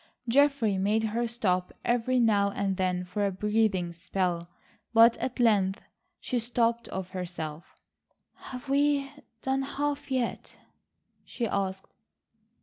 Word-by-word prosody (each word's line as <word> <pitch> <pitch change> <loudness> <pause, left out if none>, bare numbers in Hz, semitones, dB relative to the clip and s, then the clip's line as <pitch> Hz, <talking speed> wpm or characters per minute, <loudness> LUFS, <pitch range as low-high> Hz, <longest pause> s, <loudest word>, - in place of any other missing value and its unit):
Geoffrey 250 -6 +3
made 210 +3 +2
her 230 +2 0
stop 185 -6 0
every 245 +1 +2
now 205 -4 +3
and 200 -1 -1
then 180 -1 0
for 180 +3 -2
a 200 - +1
breathing 200 -3 0
spell, 175 0 -2 0.5
but 230 +1 +8
at 255 -1 -4
length 200 -5 +3 0.4
she 250 - -1
stopped 235 0 0
of 190 -1 -5
herself. 170 -4 -6 0.6
"Have 250 +1 -9
we 280 0 +2 0.3
done 265 0 +1
half 285 +1 -3
yet?" 255 -3 -2 0.7
she 240 - -4
asked. 190 -2 -2
215 Hz, 125 wpm, -28 LUFS, 190-245 Hz, 0.7 s, but